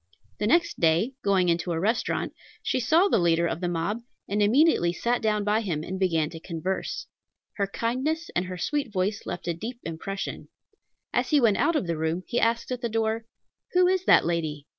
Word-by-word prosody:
The 210 - 0
next 340 +7 +2
day, 170 +10 +3
going 195 -3 +2
into 170 0 +1
a 165 - -1
restaurant, 220 +7 0 0.3
she - - 0
saw 320 - +4
the 390 - +3
leader 170 -1 +3
of 170 0 -2
the 180 - 0
mob, 175 +6 -1 0.3
and 205 +2 0
immediately 225 - +4
sat 240 +6 0
down 210 -2 +1
by 210 +2 +2
him, 165 -8 -2
and 185 +3 -5
began 165 -5 +1
to 165 - -8
converse. 180 +3 -3 0.5
Her 200 -1 +1
kindness 260 +11 -2
and 175 - +1
her 185 0 -6
sweet 280 - -1
voice 195 +1 -1
left 175 0 -5
a 170 - +1
deep 230 +9 -6
impression. 180 +4 -5 0.7
As - - +1
he 300 - +5
went 225 -6 +4
out 335 - +2
of 300 - +1
the 165 -2 -2
room, 160 +3 -1
he 240 - -1
asked 230 +2 +1
at 250 -1 -3
the 235 - -1
door, 225 0 -1 0.5
"Who 360 0 +5
is 375 0 +1
that - - +6
lady?" 160 -4 -2
200 Hz, 205 wpm, -26 LUFS, 170-235 Hz, 0.7 s, that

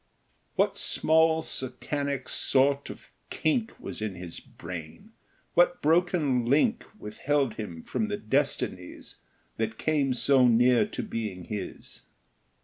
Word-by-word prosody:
What - - +1
small 160 0 +3
satanic 140 0 -4
sort 140 +1 +1
of - - -11 0.2
kink 220 +8 -1
Was - - -7
in 105 -3 -3
his 90 -1 -8
brain? 85 - -9 0.4
What 175 0 +4
broken 160 -5 +2
link 155 - +3
Withheld 135 - -1
him 90 -8 -7
from 220 - -2
the 205 -1 -2
destinies 135 - -2 0.4
That 110 0 -2
came 145 -4 +1
so 130 0 +5
near 120 - +4
to - - -5
being 105 - -4
his? 105 +2 -7
135 Hz, 120 wpm, -28 LUFS, 110-160 Hz, 0.4 s, so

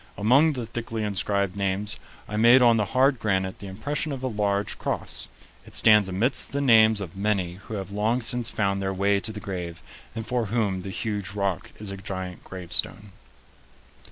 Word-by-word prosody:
Among 135 +10 +4
the 125 -4 -4
thickly 115 -1 -4
inscribed 100 -1 -1
names, 100 +1 -2 0.3
I 105 - -5
made 120 +4 +6
on 120 -1 +6
the 105 - +1
hard 130 +4 +2
granite 95 -2 -1
the 100 - -8
impression 145 +10 -3
of 135 -2 -5
a - - 0
large 105 -3 -1
cross. - - -3 0.4
It - - -11
stands 105 -3 +6
amidst 110 +9 +1
the 140 - 0
names 110 -5 +5
of 90 -3 -7
many 95 -3 -1
who 110 - -5
have 100 -1 -5
long 110 +4 +1
since 120 0 0
found 100 -2 0
their 95 0 -2
way 100 +1 +2
to 110 - -4
the 105 - -7
grave 90 -5 -6 0.3
and 110 -1 -4
for 120 -2 -1
whom 100 -4 0
the 95 - -6
huge 100 -1 -3
rock 100 -5 -2
is 105 -2 -7
a 100 - -6
giant 95 -2 -6
gravestone." 95 +2 -3
105 Hz, 185 wpm, -25 LUFS, 95-115 Hz, 0.4 s, made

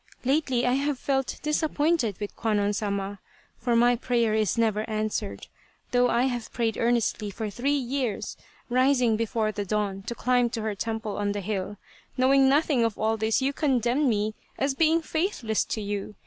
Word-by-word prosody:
Lately 265 -3 +1
I 250 - +2
have 280 +1 0
felt 270 0 -1
dis 300 +2 +1
appointed 300 - +1
with 205 -1 -5
Kwannon 210 -2 +1
Sama, 200 -1 -3 0.4
for 235 0 +1
my 240 +1 +5
prayer 235 -2 +1
is 215 -1 +1
never 220 -2 +2
answered, 215 - -3 0.5
though 245 0 +3
I 240 - +2
have 245 -3 -2
prayed 230 -2 -1
earnestly 230 -3 0
for 210 +1 -5
three 275 +7 0
years, 255 -4 -2 0.3
rising 250 -2 +3
before 220 -1 0
the 205 -1 -3
dawn 200 -1 -2
to 235 - -3
climb 245 -1 +2
to 225 -2 -4
her 220 -1 -1
temple 220 0 -3
on 205 0 0
the 205 - -3
hill. 200 0 -3 0.4
Knowing 265 +1 +5
nothing 285 -3 +3
of 225 -2 0
all 220 +1 +1
this 220 +3 +1
you 275 +1 +1
condemn 265 -1 +1
me 215 -1 0 0.2
as 275 0 +1
being 325 +3 +3
faithless 315 - -1
to 220 - -3
you. 205 0 -4
230 Hz, 175 wpm, -26 LUFS, 215-265 Hz, 0.5 s, my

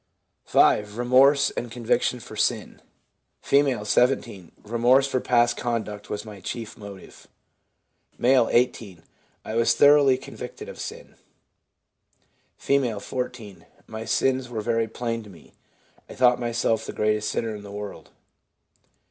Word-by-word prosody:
5. 105 +1 +3
Remorse 130 +3 +4
and 120 - -5
conviction 115 -1 0
for - - -11
sin. - - -1 0.3
— - - -48
F., 135 -7 +1
17. 115 -5 0
'Remorse 120 +5 +3
for 135 -2 -1
past 120 -1 +2
conduct 110 -4 -4
was 105 +1 -5
my 105 -2 -10
chief 110 +4 -6
motive.' 100 -3 -12 0.9
M., 125 -1 +4
18. 115 -8 0 0.4
'I 110 - -5
was 115 0 +3
thoroughly 145 -2 +5
convicted - - -9
of - - -10
sin.' - - -8 1.4
F., 125 -7 0
14. 125 -6 -6
' - - -29
My 110 - -5
sins 130 +3 0
were 115 -3 -4
very 115 +1 0
plain 115 0 -4
to 105 - -13
me. 85 -4 -17 0.6
I - - -10
thought 125 -1 +4
myself 115 -2 0
the - - -6
greatest 105 0 0
sinner 110 +1 -2
in 105 - -9
the 100 - -11
world.' 105 0 -8
115 Hz, 140 wpm, -24 LUFS, 105-125 Hz, 1.4 s, thoroughly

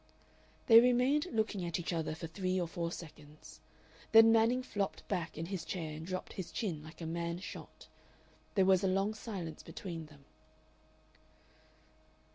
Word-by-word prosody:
They 230 -1 +10
remained 250 +6 +3
looking 215 -4 0
at 170 0 -2
each 175 +1 -3
other 160 -2 -2
for 165 - -6
three 185 +3 -1
or 175 - -1
four 170 0 -3
seconds. 150 -3 -11 0.5
Then 225 0 +9
Manning 230 +3 +4
flopped 195 -9 -3
back 165 -3 -3
in 165 - -3
his 185 -1 -4
chair 160 -3 -4
and 160 +2 -7
dropped 185 0 -4
his 185 -3 -6
chin 180 -10 -3
like 160 +2 -12
a - - -4
man 170 +1 -2
shot. 185 - -9 0.7
There 190 -2 +4
was 190 0 +4
a - - +3
long 195 +3 +1
silence 190 -8 -6
between 165 -5 -7
them. 145 -2 -18
180 Hz, 160 wpm, -34 LUFS, 165-210 Hz, 0.7 s, They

